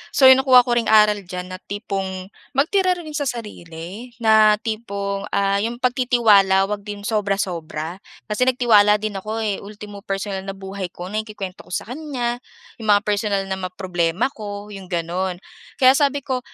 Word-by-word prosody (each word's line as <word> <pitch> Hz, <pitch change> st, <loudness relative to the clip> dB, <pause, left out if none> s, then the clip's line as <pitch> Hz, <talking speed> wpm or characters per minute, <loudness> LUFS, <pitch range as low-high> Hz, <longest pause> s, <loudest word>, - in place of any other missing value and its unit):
So 270 Hz, -, +2 dB
'yong 260 Hz, 0 st, +9 dB
nakuha 255 Hz, -2 st, +7 dB
ko 240 Hz, -, -3 dB
ring 235 Hz, -1 st, +1 dB
aral 210 Hz, -1 st, +5 dB
diyan 180 Hz, 0 st, -6 dB
na 185 Hz, -, -6 dB
tipong, 195 Hz, -2 st, -5 dB, 0.2 s
magtira 365 Hz, +6 st, +2 dB
rin 325 Hz, -3 st, -8 dB
sa 290 Hz, -1 st, -2 dB
sarili 205 Hz, -2 st, -7 dB, 0.2 s
na 215 Hz, -1 st, +6 dB
tipong, 200 Hz, -3 st, -4 dB
ah, 200 Hz, 0 st, +2 dB
'yong 230 Hz, +3 st, -2 dB
pagtitiwala, 230 Hz, -7 st, +4 dB
huwag 205 Hz, +1 st, -4 dB
din 205 Hz, -1 st, -6 dB
sobra-sobra 190 Hz, -5 st, -2 dB, 0.3 s
kasi 220 Hz, +4 st, 0 dB
nagtiwala 220 Hz, -5 st, +5 dB
din 210 Hz, -2 st, -3 dB
ako, 220 Hz, +3 st, -4 dB
eh. 205 Hz, -2 st, -1 dB
Ultimo 205 Hz, 0 st, -10 dB
personal 195 Hz, -1 st, -4 dB
na 195 Hz, -, -4 dB
buhay 195 Hz, -1 st, -6 dB
ko 180 Hz, +2 st, -7 dB
naikukuwento 210 Hz, -3 st, -6 dB
ko -, -, -15 dB
sa 235 Hz, -, -5 dB
kaniya, 250 Hz, -5 st, -3 dB, 0.4 s
'yong 220 Hz, -, -6 dB
mga 205 Hz, -, +1 dB
personal 205 Hz, -1 st, 0 dB
na 190 Hz, 0 st, -4 dB
mga 185 Hz, 0 st, -6 dB
problema 180 Hz, +5 st, 0 dB
ko, 205 Hz, -3 st, -8 dB
'yong 195 Hz, -2 st, -9 dB
gano'n. 175 Hz, +1 st, -3 dB, 0.3 s
Kaya 260 Hz, 0 st, +6 dB
sabi 280 Hz, -1 st, +1 dB
ko 260 Hz, -2 st, -1 dB
205 Hz, 170 wpm, -21 LUFS, 195-235 Hz, 0.4 s, yong